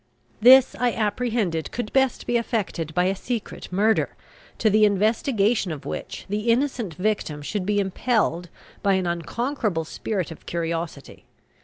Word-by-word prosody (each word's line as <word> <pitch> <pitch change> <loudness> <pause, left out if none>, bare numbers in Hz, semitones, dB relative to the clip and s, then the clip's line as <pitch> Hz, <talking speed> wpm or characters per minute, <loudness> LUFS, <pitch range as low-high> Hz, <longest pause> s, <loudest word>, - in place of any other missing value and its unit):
This 255 +3 +7
I 245 -2 +2
apprehended 210 -6 -1
could 235 -3 -4
best 265 -1 +2
be 240 - -1
effected 210 - -1
by 180 - +3
a 190 +2 +1
secret 230 -1 -5
murder, 215 +4 +2 0.4
to 225 - +1
the 215 0 +4
investigation 210 0 +2
of 150 -3 -7
which - - -6
the 210 +3 -2
innocent 235 - 0
victim 185 -7 -2
should 195 +4 -3
be 205 -1 +2
impelled 190 -3 0 0.3
by 200 -1 +3
an 190 -1 +1
unconquerable 175 - -2
spirit 185 +1 -3
of 160 - -12
curiosity. 165 -3 -4
205 Hz, 145 wpm, -24 LUFS, 175-235 Hz, 0.4 s, This